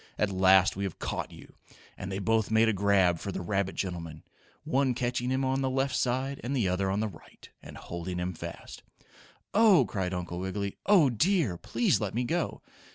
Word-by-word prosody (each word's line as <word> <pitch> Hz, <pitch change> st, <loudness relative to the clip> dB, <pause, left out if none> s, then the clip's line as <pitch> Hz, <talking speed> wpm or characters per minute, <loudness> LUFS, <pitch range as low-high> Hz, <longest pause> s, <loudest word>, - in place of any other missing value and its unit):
"At 105 Hz, -2 st, +1 dB
last 95 Hz, 0 st, +5 dB
we 100 Hz, -, -3 dB
have 95 Hz, -4 st, -4 dB
caught -, -, -4 dB
you!" -, -, -14 dB, 0.4 s
and 100 Hz, 0 st, -6 dB
they 95 Hz, -, -3 dB
both 110 Hz, +1 st, +1 dB
made 110 Hz, +1 st, +4 dB
a 110 Hz, -, +2 dB
grab 95 Hz, -4 st, +3 dB
for 100 Hz, -, -5 dB
the -, -, -4 dB
rabbit 95 Hz, +1 st, -1 dB
gentleman, 85 Hz, -5 st, -5 dB, 0.4 s
one 140 Hz, -4 st, +1 dB
catching 125 Hz, 0 st, -1 dB
him 130 Hz, +1 st, 0 dB
on 135 Hz, +1 st, 0 dB
the 135 Hz, -, 0 dB
left 135 Hz, 0 st, 0 dB
side 130 Hz, +2 st, -1 dB
and 130 Hz, +4 st, -2 dB
the 115 Hz, -7 st, +1 dB
other 95 Hz, +1 st, 0 dB
on 100 Hz, +2 st, 0 dB
the 110 Hz, -, 0 dB
right, 90 Hz, -6 st, -14 dB
and -, -, -11 dB
holding 85 Hz, +1 st, -6 dB
him 90 Hz, +1 st, -2 dB
fast. 80 Hz, -, -9 dB, 0.7 s
"Oh!" 200 Hz, -, +6 dB
cried 95 Hz, -4 st, -3 dB
Uncle 90 Hz, 0 st, -5 dB
Wiggily. 100 Hz, +2 st, -3 dB
"Oh, 180 Hz, -10 st, +5 dB
dear! 150 Hz, -, +1 dB
Please 115 Hz, +7 st, 0 dB
let 105 Hz, -1 st, -3 dB
me 125 Hz, -, +1 dB
go!" 165 Hz, +7 st, -2 dB
105 Hz, 200 wpm, -29 LUFS, 95-130 Hz, 0.7 s, Oh